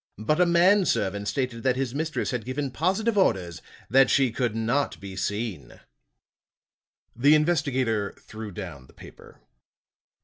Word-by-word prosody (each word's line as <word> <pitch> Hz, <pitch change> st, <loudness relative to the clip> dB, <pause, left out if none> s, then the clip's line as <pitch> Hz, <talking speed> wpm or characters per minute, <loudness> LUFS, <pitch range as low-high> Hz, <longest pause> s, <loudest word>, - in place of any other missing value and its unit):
But 150 Hz, -, 0 dB
a 180 Hz, -, +4 dB
man 180 Hz, +3 st, +4 dB
servant 100 Hz, +2 st, -1 dB
stated 125 Hz, -3 st, -2 dB
that 130 Hz, 0 st, +1 dB
his 130 Hz, -2 st, -2 dB
mistress 155 Hz, +2 st, -2 dB
had 125 Hz, -3 st, -3 dB
given 130 Hz, +3 st, -3 dB
positive 195 Hz, -, 0 dB
orders 90 Hz, -, 0 dB, 0.3 s
that 135 Hz, -1 st, +5 dB
she 135 Hz, -3 st, +3 dB
could 115 Hz, -1 st, -2 dB
not 115 Hz, +6 st, -1 dB
be 95 Hz, -1 st, -9 dB
seen." 100 Hz, -, -4 dB, 1.4 s
The 145 Hz, +6 st, +5 dB
investigator 130 Hz, -10 st, 0 dB
threw 110 Hz, -1 st, -9 dB
down 80 Hz, -8 st, -8 dB
the -, -, -20 dB
paper. -, -, -15 dB
125 Hz, 140 wpm, -25 LUFS, 105-150 Hz, 1.4 s, that